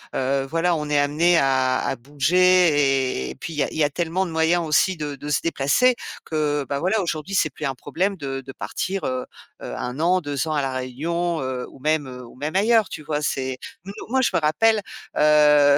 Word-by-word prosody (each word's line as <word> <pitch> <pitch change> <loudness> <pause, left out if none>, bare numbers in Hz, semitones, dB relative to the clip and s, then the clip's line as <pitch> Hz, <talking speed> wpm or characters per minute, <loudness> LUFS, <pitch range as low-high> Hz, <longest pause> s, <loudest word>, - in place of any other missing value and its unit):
heu, 135 +1 0
voilà, 170 +2 +1
on 150 -2 -4
est 150 - +2
amenés 155 +5 +3
à 130 -2 +2
à - - -1
bouger 145 - +2
et - - -7
puis 165 - -7
il - - -8
y 150 - +2
a - - -1
il - - -8
y 160 - +3
a 145 - +2
tellement 175 +4 -1
de 175 - -6
moyens 165 +1 +2
aussi 175 +4 +2
de 150 -2 -4
de 145 +2 -8
se 150 - +2
déplacer 165 - +2 0.3
que, 150 -2 -1
bah 140 -1 -2
voilà, 190 +7 +1
aujourd'hui, 170 +2 -3
c'est 155 -5 +2
plus 150 - -6
un 135 -2 -2
problème 185 +10 -2
de 135 -3 -4
de 135 0 -10
partir, 190 +7 -4
heu 130 0 -2 0.4
heu, - - -6
1 125 +3 -5
an, 180 +3 +3
2 145 -2 -3
ans 155 - -1
à 145 - +1
la 135 -1 -2
Réunion, 160 +7 -2
heu, 130 -1 -4
ou - - -16
même 150 0 0
ou 125 -2 -10
même 150 +6 -5
ailleurs, 215 0 +3
tu 155 - -7
vois? 150 0 -2
C'est 130 -3 -2 0.3
nous 195 - -7 0.2
moi, 265 +2 +2
je 260 - +2
me - - +3
rappelle, 215 +8 +3 0.3
heu 150 -1 +5
150 Hz, 225 wpm, -23 LUFS, 135-170 Hz, 0.4 s, heu